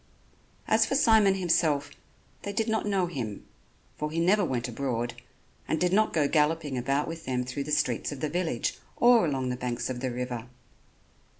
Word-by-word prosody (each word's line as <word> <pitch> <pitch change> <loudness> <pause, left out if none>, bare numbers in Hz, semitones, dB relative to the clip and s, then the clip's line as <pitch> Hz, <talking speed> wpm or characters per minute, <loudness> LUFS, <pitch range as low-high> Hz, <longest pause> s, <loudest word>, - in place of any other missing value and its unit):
As - - +4
for - - 0
Simon 220 -7 +5
himself, 155 -6 +1 0.5
they 200 - -4
did 220 +1 0
not 220 -1 0
know 195 -3 +1
him, 125 - -5 0.5
for 150 - -2
he 160 +2 -2
never 195 +5 +3
went 125 -7 -1
abroad, 120 -1 -2 0.5
and 160 - 0
did 180 +2 +1
not 215 +2 +3
go 150 -3 +2
galloping 150 -2 +1
about 135 +4 0
with 165 0 -7
them 125 -1 -1
through 140 +3 -4
the 150 - -5
streets 145 -5 0
of 145 - -6
the 155 - -1
village 160 -6 -2 0.2
or 240 -6 +5
along 135 -3 -1
the 125 - -1
banks 125 0 -3
of 125 - -5
the 130 0 -2
river. 125 -1 -4
150 Hz, 185 wpm, -28 LUFS, 125-180 Hz, 0.5 s, Simon